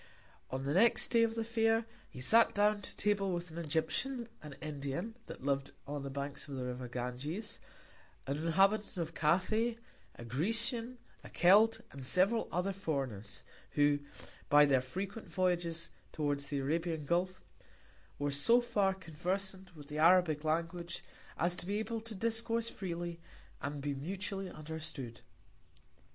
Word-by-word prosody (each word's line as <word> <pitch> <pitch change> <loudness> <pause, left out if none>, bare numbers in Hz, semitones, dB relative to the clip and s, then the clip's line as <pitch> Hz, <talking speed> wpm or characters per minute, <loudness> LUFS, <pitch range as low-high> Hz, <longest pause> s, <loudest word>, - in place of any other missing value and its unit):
On 130 +1 -3
the 140 +1 0
second 225 +7 +4
Day 230 - +5
of 230 0 +2
the 225 - 0
Fair, 225 0 +2 0.2
he - - -10
sat 225 - +5
down 205 0 +3
to - - -6
Table 200 -2 +2
with 175 -1 -3
an 165 - -6
Egyptian, 165 - -1
an 150 -2 -9
Indian, 150 +7 -4
that - - -9
liv'd 140 -1 0
on 145 0 -4
the 140 - -5
Banks 140 +2 -5
of 140 - -6
the 130 -1 -3
River 125 0 -4
Ganges, 125 - -4 0.7
an 140 +1 -1
Inhabitant 195 +7 +2
of 165 -1 -2
Cathay, 205 +9 +2 0.4
a 120 - -9
Grecian, 230 - 0 0.3
a - - -10
Celt, 210 +5 +5
and 135 - -8
several 190 - +2
other 180 +3 0
Foreigners, 135 - -4 0.3
who 145 0 +4 0.5
by 145 0 +8
their 135 -3 +4
frequent 195 - -5
Voyages 175 -3 0 0.2
towards 145 -2 -1
the 145 - -2
Arabian 160 +2 -1
Gulf, 180 +4 0 0.8
were 145 0 -1
so 140 - +5
far 205 -6 +1
conversant 185 +2 -4
with 150 -2 -10
the 150 +1 -4
Arabic 165 -2 +5
Language, 170 +2 -2 0.3
as 175 +1 +1
to 175 - -2
be 205 +1 0
able 225 +1 -2
to 225 -1 -7
discourse 230 +2 0
freely, 175 -2 -4 0.4
and 145 0 -4
be 145 0 0
mutually 190 +6 -4
understood. 155 -7 -7
170 Hz, 150 wpm, -34 LUFS, 145-205 Hz, 0.8 s, by